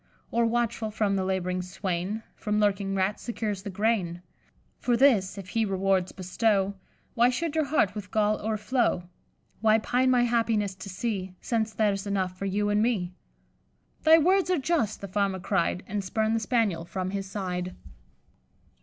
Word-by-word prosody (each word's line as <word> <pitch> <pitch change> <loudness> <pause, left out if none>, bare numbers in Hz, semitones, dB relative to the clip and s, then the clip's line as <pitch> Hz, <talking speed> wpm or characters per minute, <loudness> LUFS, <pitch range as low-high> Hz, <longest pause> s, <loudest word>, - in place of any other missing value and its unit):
Or, 235 0 +2
watchful 230 -1 0
for 215 0 0
the 195 -1 +1
lab'ring 185 -1 -1
swain, 185 +3 -3
From 210 0 -1
lurking 200 -1 +1
rats 195 +2 0
secures 215 -4 -3
the 200 - -6
grain? 185 -4 0 0.6
For 240 -1 +1
this, 225 -8 +4
if 195 -1 -8
he 225 +2 +1
rewards 190 -2 +1
bestow, 195 +1 +1 0.4
Why 240 0 +4
should 305 +5 -2
your 315 -1 +1
heart 270 -9 +2
with 205 -2 -7
gall 215 0 +1
o'erflow? 220 -3 0 0.5
Why 220 +1 +4
pine 250 +4 +1
my 250 -1 +4
happiness 225 -4 +1
to 190 +1 -9
see, 190 -2 -3
Since 225 -2 -1
there's 205 -2 0
enough 190 -2 -1
for 195 - -5
you 205 +2 0
and 205 0 +3
me?' 205 -7 0 0.9
'Thy 320 +1 +7
words 370 +4 +3
are 365 - +3
just,' 280 - 0
the 200 - -5
Farmer 195 0 0
cried, 180 -1 0
And 205 0 -3
spurned 220 +4 0
the - - +1
Spaniel 220 -7 0
from 185 +2 -4
his 195 -1 -4
side." 185 -2 -3
205 Hz, 165 wpm, -27 LUFS, 190-230 Hz, 0.9 s, Thy